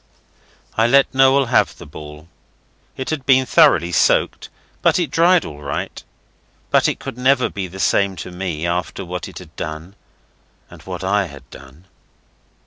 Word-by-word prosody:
I 115 +1 +3
let 140 +3 +4
Noel 135 +1 +4
have 115 - +1
the - - -11
ball. 75 +1 -11 0.7
It 130 - -4
had 150 -4 -3
been 130 0 +4
thoroughly 85 -7 +4
soaked, 80 - +1 0.3
but - - +3
it 175 -4 -1
dried 175 +1 +4
all 75 -1 -9
right. 70 -1 -5 0.7
But - - +4
it - - -2
could 120 - -8
never 130 0 +3
be 95 -2 -5
the 95 +2 -11
same 100 0 +1
to 90 +1 -8
me 90 -3 -4
after 85 +2 -3
what 90 -1 -5
it - - -11
had - - -12
done 80 +4 -6 0.8
and - - -13
what - - -7
I 100 +1 +1
had 70 -3 -13
done. 70 +6 -15
95 Hz, 165 wpm, -19 LUFS, 80-130 Hz, 0.8 s, let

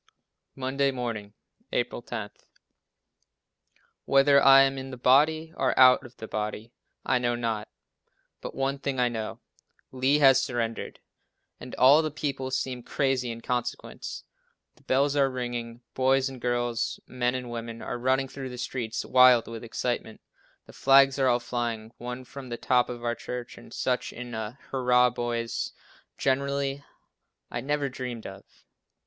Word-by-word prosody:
Monday 135 +1 0
Morning, 115 -5 -4 0.4
April - - -1
10. - - -6 1.7
"Whether 140 0 +5
I 135 0 +8
am 135 0 0
in 130 0 -7
the 130 - -8
body, 155 +6 +3
or 130 -1 0
out 130 +1 +7
of 125 -1 -14
the 110 - -8
body, 105 +2 -4 0.3
I 125 - +2
know 120 -1 0
not, 115 -3 -2 0.7
but - - -7
one 135 +1 -1
thing 135 -2 -2
I 125 -1 +3
know," 110 -2 -5 0.5
Lee 130 +3 +2
has 135 -3 +6
surrendered! 115 -2 -3 0.6
and 125 - -8
all 140 +5 +7
the 155 - -1
people 135 -3 -3
seem 130 -1 -2
crazy 130 -1 0
in 115 0 -6
consequence. 125 0 -4 0.5
The - - -25
bells 140 +2 +1
are 140 -1 +3
ringing, 120 -2 -5
boys 130 +1 +2
and 130 -2 -10
girls, 120 -1 -1
men 125 0 -1
and 125 -2 -5
women 115 -1 -6
are 120 - -4
running 130 +2 +1
through 135 0 -7
the 125 - -8
streets 120 -2 -3
wild 125 -2 +6
with 115 0 -7
excitement; 120 -1 -3 0.5
the - - -15
flags 135 0 +5
are 135 - +3
all 120 -1 +3
flying, 120 -2 -3
one 125 +1 -6
from 130 0 -10
the 120 - -4
top 125 0 +2
of 120 -1 -7
our 120 0 0
church, 125 0 -7
and 120 - -14
such 125 -1 -1
a 115 -1 -6
"hurrah 125 -1 +3
boys" 120 -1 -3 0.4
generally, 140 +1 0 0.7
I - - -3
never 145 +1 -1
dreamed 125 -3 -6
of. 95 0 -9
125 Hz, 155 wpm, -27 LUFS, 120-135 Hz, 1.7 s, I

